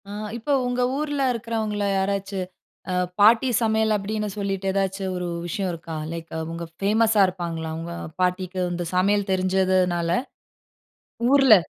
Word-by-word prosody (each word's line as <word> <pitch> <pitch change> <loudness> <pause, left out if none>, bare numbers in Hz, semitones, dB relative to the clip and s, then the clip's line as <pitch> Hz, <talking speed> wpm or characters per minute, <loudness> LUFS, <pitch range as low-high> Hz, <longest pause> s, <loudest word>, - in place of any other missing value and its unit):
ஆ - - -7 0.3
இப்ப 240 +5 -3 0.2
உங்க 245 0 0 0.2
ஊர்ல 290 -1 -1
இருக்கிறவங்கள்ல 220 -3 -2
யாராச்சு 195 0 -1 0.5
அ - - 0 0.3
'பாட்டி 230 +5 +6
சமையல்' 220 -1 +2
அப்படின்னு 210 +1 -2
சொல்லிட்டு, 195 -1 -2
ஏதாச்சு 195 0 -1
ஒரு 180 0 -3 0.2
விஷயம் 190 +2 -2
இருக்கா? 165 -1 -6
லைக் 165 0 -6
அவுங்க 165 +1 -5 0.2
ஃபேமஸா 215 +1 +4
இருப்பாங்களா? 170 -3 -4
உங்க 170 +1 -5 0.3
பாட்டிக்கு 185 0 0
இந்த 175 0 -3
சமையல் 200 +2 +2
தெரிஞ்சதுனால, 185 -2 +2 1.2
ஊர்ல? 270 -5 +8
195 Hz, 130 wpm, -24 LUFS, 180-220 Hz, 1.2 s, ஊர்ல